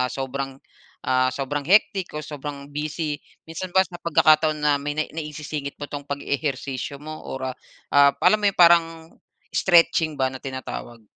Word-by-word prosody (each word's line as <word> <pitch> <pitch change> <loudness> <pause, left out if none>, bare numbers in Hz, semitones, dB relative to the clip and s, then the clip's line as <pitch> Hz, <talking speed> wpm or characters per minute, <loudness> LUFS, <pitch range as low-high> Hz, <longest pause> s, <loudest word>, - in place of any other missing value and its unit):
ah, 125 - +1
sobrang 135 0 -4 0.5
ah 130 0 +2
sobrang 135 +2 -3
hectic 195 -1 +3
o 150 - -4
sobrang 145 -1 -7
busy 150 0 -3 0.2
minsan 165 +3 -6
ba 190 - +7
sa 175 0 -11
pagkakataon 155 -1 +4
na 150 -1 +1
may 145 +1 -4
nai 155 - -2
naisisingit 150 -2 -5
mo 145 - -6
tong 145 0 -7
pag-ehersisyo 140 -1 -3
mo 155 +2 -8 0.2
or 130 0 -4
ah - - -18 0.4
ah 140 0 +6
alam 215 - +5
mo 205 - +3
yung 195 - -3
parang 170 -1 +7 0.7
stretching 165 -3 +3
ba 130 -1 0
na 130 - -8
tinatawag? 130 -3 -7
145 Hz, 165 wpm, -23 LUFS, 135-160 Hz, 0.7 s, ba